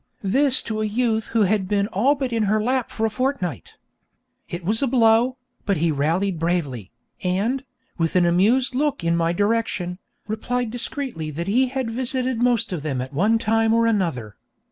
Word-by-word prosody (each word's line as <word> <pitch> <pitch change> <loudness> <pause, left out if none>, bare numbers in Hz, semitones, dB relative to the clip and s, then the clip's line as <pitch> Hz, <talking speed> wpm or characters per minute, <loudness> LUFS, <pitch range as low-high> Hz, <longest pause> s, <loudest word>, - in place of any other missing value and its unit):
this 265 +7 +3
to 215 -1 -3
a - - 0
youth 220 0 0
who 225 -2 +2
had 200 -1 +1
been 200 0 +1
all 250 +8 +2
but 265 -3 -3
in 225 - +1
her 215 +1 +2
lap 250 +3 0
for 225 - -2
a - - +1
fortnight. 210 - -3 0.7
It 175 0 -6
was 220 +6 +1
a 275 - +2
blow, 240 0 +3 0.3
but 200 -2 0
he 165 +1 +1
rallied 165 +5 0
bravely, 150 - -2 0.3
and, 205 +9 0 0.4
with 165 +1 0
an 180 -1 +4
amused 215 +10 +3
look 285 - 0
in 170 0 +2
my 165 0 +1
direction, 200 -2 -1 0.3
replied 240 +2 -2
discreetly 245 - -4
that 160 +3 -4
he 245 +7 +2
had 255 -2 -3
visited 255 0 -1
most 245 -6 +2
of 170 - -3
them 140 -4 -2
at 130 +2 -5
one 210 +10 +3
time 225 0 +2
or 230 0 +3
another. 165 - -1
215 Hz, 185 wpm, -22 LUFS, 175-245 Hz, 0.7 s, an